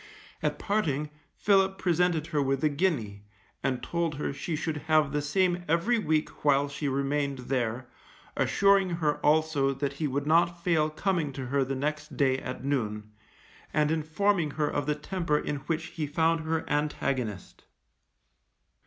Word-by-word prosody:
At - - -1
parting, 150 -8 -1 0.2
Philip 195 -1 +3
presented 175 -3 +1
her 145 - +2
with 135 0 0
a 155 - +4
guinea, 140 - -1 0.4
and 130 -2 -1
told 170 -3 -1
her 145 - -3
she 160 +3 -3
should 155 0 -2
have 155 -2 +4
the 150 0 0
same 175 +4 +1
every 170 +10 +2
week 155 -6 -1
while 145 -1 +4
she 145 +1 -4
remained 140 +1 0 0.2
there, 120 0 -1 0.5
assuring 195 -1 +3
her 150 -3 +1
also 150 -3 +2
that 140 +1 -2
he 150 +2 -2
would 140 +1 -2
not 170 +2 +2
fail 160 -3 +2
coming 165 -2 -1
to 130 -1 -5
her 135 +2 +1
the 135 +1 -3
next 150 +2 -3
day 130 -2 +2
at 125 0 -6
noon, 105 -6 -2 0.6
and 150 0 +3
informing 160 +2 +1
her 150 +1 -1
of 145 -1 -2
the 150 - +1
temper 160 0 -1
in 150 - -2
which 165 0 -1
he 155 -3 -3
found 165 +3 +2
her 160 0 -2
antagonist. 135 -8 -2
150 Hz, 160 wpm, -28 LUFS, 140-165 Hz, 0.6 s, a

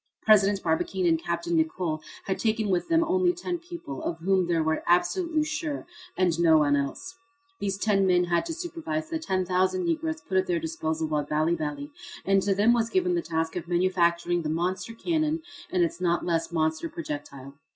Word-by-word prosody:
President 200 -2 +4
Barbicane 175 +3 0
and 165 -1 +3
Capt. 170 0 -3
Nicholl 160 -1 0 0.2
had 190 - -2
taken 220 -2 0
with 180 -2 +1
them 330 0 +3
only 360 +1 +2
ten 350 0 -4
people, 340 - -8
of 165 - -3
whom 185 +1 +1
they 170 -1 +1
were 160 0 +1
absolutely 315 - +2
sure, 305 -1 -3 0.3
and 175 -3 +2
no 165 -2 +6
one 145 -2 +3
else. 140 - -4 0.4
These 195 -1 -2
ten 200 -2 +2
men 180 -1 +4
had 175 - 0
to 330 - -3
supervise 320 -2 -4
the 325 - -1
10,000 185 - 0
Negroes 320 -1 -1
put 190 -10 0
at 185 - -1
their 175 - +1
disposal 160 0 -2
by 150 -1 0
Bali 155 +3 0
Bali, 150 -3 -4 0.3
and 195 0 +3
to 195 0 +1
them 215 +4 +4
was 230 -1 +1
given 360 +2 +1
the 345 - +1
task 160 - -2
of 175 -1 -4
manufacturing 175 -1 +1
the 155 - -3
monster 185 +7 -2
cannon 315 +2 0 0.3
and 180 -2 +2
its 170 +1 -2
not 175 -1 +1
less 165 -1 0
monster 160 0 0
projectile. 145 -4 -7
180 Hz, 190 wpm, -27 LUFS, -, 0.4 s, no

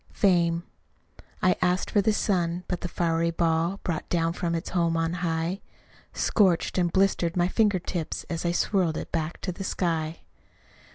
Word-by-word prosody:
Fame 170 -3 +2 0.8
I 185 - +4
asked 180 0 +1
for 205 - +4
the 220 - +2
sun! 180 -4 0
but 180 - -3
the - - -2
fiery 170 -1 0
ball, 170 +3 0
Brought 170 -4 -3
down 165 -1 +1
from 170 -2 -2
its 165 - -4
home 170 -2 +1
on 165 0 0
high, 165 +3 -1 0.5
Scorched 185 -4 +2
and 175 -1 +1
blistered 185 -3 +1
my 175 0 +3
finger 205 0 +2
tips, 170 -2 -4
As 165 -1 -3
I 170 - +1
swirled 175 -2 +1
it - - -6
back 165 0 -2
to 185 - -2
the 180 - -6
sky. 165 -4 -1
175 Hz, 170 wpm, -26 LUFS, 165-185 Hz, 0.8 s, I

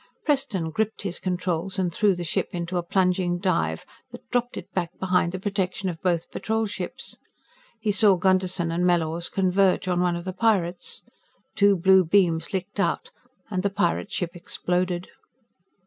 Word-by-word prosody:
Preston 265 - 0
gripped 220 +4 -2
his 190 -3 -2
controls 180 0 -2
and 180 -3 0
threw 205 -1 +3
the 175 - -4
ship 160 - -1
into 175 +1 -3
a - - +1
plunging 180 -1 +1
dive 165 - 0 0.2
that - - -12
dropped 245 0 0
it - - -6
back 175 -3 -1
behind 180 -2 +2
the 185 - -4
protection 190 -1 -2
of 165 -2 -6
both 170 -3 0
Patrol 220 +3 -1
ships. 205 - -6 0.6
He 215 -1 0
saw 200 0 +5
Gunderson 185 -2 +1
and 170 +2 0
Mellors 170 -1 +1
converge 190 0 +2
on 180 -1 +1
one 175 -1 +2
of 170 +1 -6
the 185 - -3
pirates. 185 -5 0 0.5
Two 200 -1 +5
blue 190 +1 +5
beams 170 -2 +2
licked 195 +1 -4
out, 200 - 0 0.4
and 185 -2 0
the 200 - +1
pirate 195 0 0
ship 175 -2 -2
exploded. 180 +1 -2
185 Hz, 165 wpm, -25 LUFS, 175-195 Hz, 0.6 s, saw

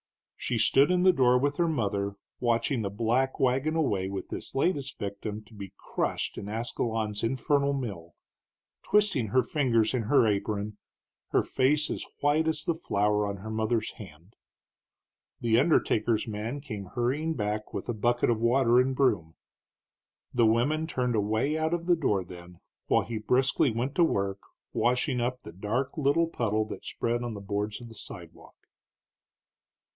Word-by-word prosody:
She 120 - -2
stood 135 +5 +4
in 180 0 +2
the 185 0 +6
door 125 -5 +4
with 145 +3 0
her 170 - +2
mother, 100 -9 -1 0.2
watching 120 +1 +1
the 100 - -2
black 120 +6 0
wagon 135 +5 +1
away 100 -12 0
with 100 -1 -5
this - - -7
latest 140 -2 0
victim 105 +1 -5
to 110 - -20
be 100 -2 -9
crushed - - -2
in 100 - -7
Ascalon's 110 -1 -2
infernal 140 +4 +1
mill, 100 -11 -5 0.7
twisting 205 - +2
her 130 +5 +3
fingers 115 -5 +1
in 125 - +1
her 120 +2 +4
apron, 105 0 -1 0.5
her - - +2
face 145 +3 +1
as - - -3 0.2
white 150 +2 +2
as 155 -2 0
the 170 - +1
flour 105 -9 0
on 100 0 -4
her 110 +3 -7
mother's 110 0 0
hands. 90 0 -13 1.1
The 115 -1 +3
undertaker's 120 -7 +2
man 110 +6 -4
came 110 -9 -6
hurrying 135 - -1
back 105 -1 -3
with - - -5
a 120 - -1
bucket 120 +2 +1
of 115 - 0
water 120 0 +4
and 130 +1 +2
broom. 85 -12 +1 1.0
The 120 -2 +4
women 145 +8 +2
turned 125 -5 -1
away 110 +8 +1
out 160 +1 +1
of 170 -1 -5
the 175 0 +4
door 105 - 0
then, 85 0 -12 0.3
while - - +3
he 115 -2 -4
briskly 130 +5 +2
went 120 +4 -2
to 175 - +5
work 100 -9 0 0.3
washing 125 +1 +1
up 125 +1 -2
the - - -10
dark 115 +8 -2
little 155 +2 +2
puddle 110 -8 0
that - - -7
spread 120 +1 -1
on 120 -2 -4
the - - -6
boards 105 +1 -3
of 120 - -10
the 115 - -13
sidewalk. - - -11
120 Hz, 165 wpm, -28 LUFS, 105-135 Hz, 1.1 s, the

